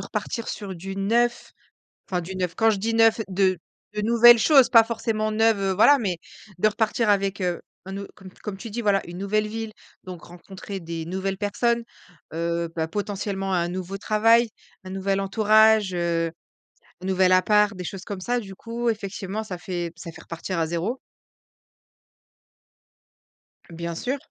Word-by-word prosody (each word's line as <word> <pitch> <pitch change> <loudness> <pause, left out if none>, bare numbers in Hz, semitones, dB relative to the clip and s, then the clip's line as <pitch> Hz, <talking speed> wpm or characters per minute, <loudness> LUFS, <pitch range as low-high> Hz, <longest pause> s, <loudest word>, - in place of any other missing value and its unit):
repartir 230 - -4
sur 200 -3 -5
du 190 +3 -7
neuf, 235 +5 0 0.6
enfin 180 - 0
du 185 +3 -7
neuf, 180 -2 -2
quand 225 0 +3
je 215 - +1
dis 225 +4 -2
neuf 225 0 +4
de 190 -1 +2 0.4
de 210 - -1
nouvelles 235 +2 +7
choses, 270 0 +6
pas 230 -2 +7
forcément 220 -1 -2
neuves, 225 0 +3
heu, 195 0 +1
voilà, 280 +9 +6
mais 185 -7 -2 0.4
de 215 - +4
repartir 220 +1 0
avec, 195 -1 +1
heu, 175 -2 -1 0.2
un 190 +1 -6
aut 200 0 -6
comme 190 -2 -12
comme 205 -3 -5
tu 230 - -8
dis 235 +3 -4
voilà, 200 -2 +2
une 175 +1 -8
nouvelle 210 +2 0
ville, 225 0 -5 0.3
donc 180 -3 -9
rencontrer 190 +2 -9
des 165 -1 -5
nouvelles 190 +2 -3
personnes, 235 +4 0 0.5
heu, 170 +1 -1
bah, 160 -1 -2
potentiellement 195 0 -3
un 175 -1 +1
nouveau 185 +2 -5
travail, 225 +3 +3 0.3
un 185 - -9
nouvel 195 +1 -1
entourage, 215 0 +4
heu, 170 -1 0 0.7
un - - -8
nouvel 185 -1 +3
appart, 210 +3 +3
des 180 - -6
choses 190 +2 -6
comme 200 -2 -6
ça, 245 +5 0
du 195 -4 -9
coup, 235 +3 -3
effectivement 205 -1 -4
ça 190 -5 -6
fait 175 -2 -4
ça 165 0 -8
fait - - -12
repartir 170 +2 -5
à 165 - +1
0. 175 +10 -2 2.7
Bien 170 0 -5
sûr. 260 +10 -2
195 Hz, 170 wpm, -24 LUFS, 185-220 Hz, 2.7 s, nouvelles